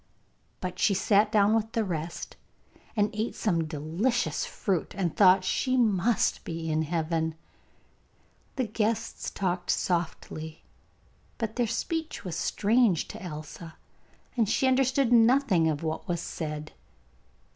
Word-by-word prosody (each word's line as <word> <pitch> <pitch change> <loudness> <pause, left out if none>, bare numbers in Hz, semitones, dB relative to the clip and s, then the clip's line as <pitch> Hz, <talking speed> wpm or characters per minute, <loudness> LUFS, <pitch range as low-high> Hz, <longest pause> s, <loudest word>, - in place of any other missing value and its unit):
But 180 0 -5
she 200 - +3
sat 205 +2 +3
down 210 -1 +4
with 225 0 0
the 225 -2 +1
rest, 170 -3 -5 0.6
and 210 -1 +2
ate 215 +2 -2
some 170 -7 0
delicious 160 - -1
fruit, 185 -4 -2
and 175 -5 -1
thought 185 -1 +6
she 255 +7 0
must 220 -2 +2
be 165 -1 -4
in 155 0 +1
heaven. 160 0 -1 1.2
The 260 - 0
guests 225 +1 -2
talked 180 -2 -2
softly, 160 -2 -2 0.7
but 220 -2 -3
their 245 -2 +1
speech 320 - -3
was 175 -3 -4
strange 215 -3 +2
to - - -8
Elsa, 160 -1 -8 0.6
and 225 -5 +2
she 265 - +2
understood 260 -1 +3
nothing 230 -8 +4
of 150 0 -2
what 160 0 -3
was 170 -1 -1
said. 155 -2 -5
190 Hz, 130 wpm, -28 LUFS, 165-225 Hz, 1.2 s, thought